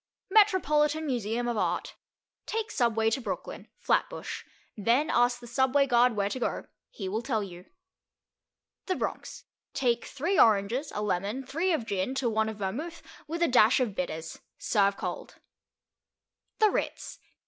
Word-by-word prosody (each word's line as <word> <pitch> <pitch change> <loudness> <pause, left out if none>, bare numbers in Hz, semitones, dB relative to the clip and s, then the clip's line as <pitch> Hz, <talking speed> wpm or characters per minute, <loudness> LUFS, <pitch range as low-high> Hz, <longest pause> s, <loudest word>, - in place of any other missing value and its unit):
Metropolitan 315 -7 +3
Museum 240 -3 -1
of 240 -2 -1
Art. - - -1 0.5
Take 445 0 -2
Subway 225 -3 +2
to 265 - -1
Brooklyn. - - -6
(Flatbush.) - - -1 0.3
Then 235 +8 +2
ask 245 0 +3
the 245 - -11
subway 265 +3 +2
guard 245 -2 +4
where 200 -1 +1
to 255 - -4
go; - - -2 0.2
he 195 - -6
will 215 +4 -2
tell 230 -4 -1
you. 180 -2 -10 1.2
The 370 - 0
Bronx. - - -5 0.3
Take 240 -3 +1
three 340 +8 -1
oranges, 225 +7 +3
a 210 - -2
lemon, 210 +6 -2
three 330 +8 0
of 310 -9 0
gin, 200 +4 -2
to 250 -3 0
one 220 0 +1
of 220 - -7
vermouth, 275 - -4 0.2
with 335 +3 -1
a - - +4
dash 245 -1 +5
of 240 -6 0
bitters. 160 -4 -4 0.2
Serve 200 -2 +2
cold. - - -5 1.2
The 430 -2 +4
Ritz. - - -3
240 Hz, 150 wpm, -28 LUFS, 210-285 Hz, 1.2 s, dash